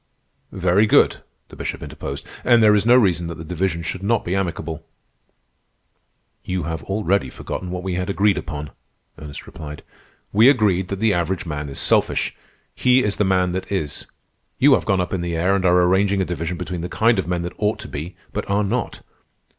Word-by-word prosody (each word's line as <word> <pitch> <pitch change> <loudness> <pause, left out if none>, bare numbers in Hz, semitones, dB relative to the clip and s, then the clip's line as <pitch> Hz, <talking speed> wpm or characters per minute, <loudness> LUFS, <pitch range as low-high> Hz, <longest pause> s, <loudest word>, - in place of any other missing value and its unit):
"Very 95 +3 +2
good," - - +4 0.3
the - - -12
Bishop - - -5
interposed. - - -6 0.2
"And 120 -2 +5
there 105 -1 +7
is 105 +1 +2
no 120 - +7
reason 90 -8 +3
that 85 - -5
the 80 - -7
division 85 0 -2
should 95 +3 -4
not 110 +3 +1
be 90 - -1
amicable." 85 -4 -3 1.6
"You 90 -2 -2
have 80 0 -4
already 95 -7 0
forgotten 90 +7 -6
what 90 0 -4
we 95 -1 -2
had 90 +2 -2
agreed 100 0 +3
upon," 75 -2 -6 0.5
Ernest 75 -2 -9
replied. 75 -2 -9 0.5
"We 110 +5 +7
agreed 100 -8 +2
that 100 - -3
the 110 +1 +2
average 90 +1 -1
man 75 -3 -4
is 70 - -8
selfish. - - +1 0.4
He 125 0 +3
is 105 - -1
the - - +2
man 95 -1 +2
that 95 +2 -4
is. 80 -8 -3 0.5
You - - +6
have - - +2
gone 95 -2 +2
up 90 - -3
in 95 - -1
the 85 -1 -2
air 95 +4 +2
and 95 - 0
are 90 0 +5
arranging 95 +2 +2
a 95 - +1
division 85 0 -3
between 90 -1 -4
the 90 - -4
kind 115 -1 +2
of 90 - -2
men 90 -1 -1
that 90 - -5
ought 105 0 +1
to 110 - -8
be 80 +6 -6 0.2
but - - -4
are 100 +1 +2
not. 115 +4 -2
90 Hz, 200 wpm, -21 LUFS, 85-100 Hz, 1.6 s, there